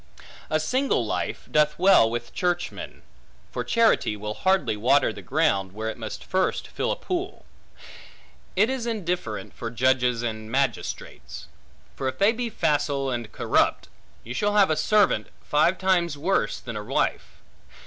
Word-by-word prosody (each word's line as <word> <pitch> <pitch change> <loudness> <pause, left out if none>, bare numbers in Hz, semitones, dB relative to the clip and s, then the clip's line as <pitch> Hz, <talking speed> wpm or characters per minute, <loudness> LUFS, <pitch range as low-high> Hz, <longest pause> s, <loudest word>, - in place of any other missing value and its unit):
A 155 - +1
single 255 - 0
life - - -3
doth 150 0 +3
well 185 -11 +6
with 120 0 -5
churchmen; 175 -1 -3 0.5
for - - -3
charity 225 - +2
will 105 +1 -4
hardly 190 - +1
water 125 +3 +3
the 100 - -9
ground, 100 - 0
where 110 +2 -3
it - - -11
must 110 -2 -6
first 185 0 -1
fill - - -2
a - - 0
pool. 365 +1 -4 1.1
It 205 +4 +4
is 260 -2 -3
indifferent 180 - -3
for 115 - -5
judges 125 0 +1
and 110 -2 -4
magistrates; 115 - -3 0.5
for 135 - -3
if 130 0 -3
they 200 +3 +4
be 240 0 -3
facile 145 -7 0
and 120 -3 -4
corrupt, - - +1 0.3
you 120 - -6
shall 205 +10 0
have 200 -5 +5
a - - +2
servant, 205 +6 +2 0.2
five 160 +5 +2
times 175 -5 +1
worse 160 - 0
than 115 -2 -7
a 105 - -4
wife. - - -2
145 Hz, 155 wpm, -25 LUFS, 115-190 Hz, 1.1 s, well